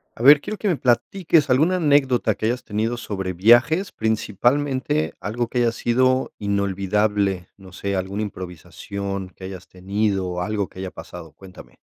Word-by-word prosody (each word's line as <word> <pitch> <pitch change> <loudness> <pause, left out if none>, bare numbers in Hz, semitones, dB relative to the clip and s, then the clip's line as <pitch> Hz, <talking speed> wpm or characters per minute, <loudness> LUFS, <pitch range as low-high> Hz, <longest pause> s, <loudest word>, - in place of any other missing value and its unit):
A - - -10
ver, 145 +3 +8
quiero 215 - -5
que 210 - -2
me 180 - +2
platiques 145 +6 +2
alguna 155 +9 +3
anécdota 135 - +2
que 110 - -4
hayas 120 +2 -1
tenido 110 +3 -2
sobre 95 -5 -4
viajes, 120 - +4
principalmente, 130 +7 0
algo 115 +3 -2
que 125 - -5
haya 120 -1 +3
sido 130 +3 +1
inolvidable, 100 -1 0
no 95 -1 -14
sé, 100 +1 -3
alguna 95 +2 -3
improvisación 95 +1 -6
que 95 - -11
hayas 95 -1 -8
tenido 95 +1 -1
o 90 0 -3
algo 105 +1 -2
que - - -18
haya 95 -1 -5
pasado, 85 -3 -10
cuéntame. 90 -10 -15
105 Hz, 160 wpm, -22 LUFS, 95-130 Hz, -, ver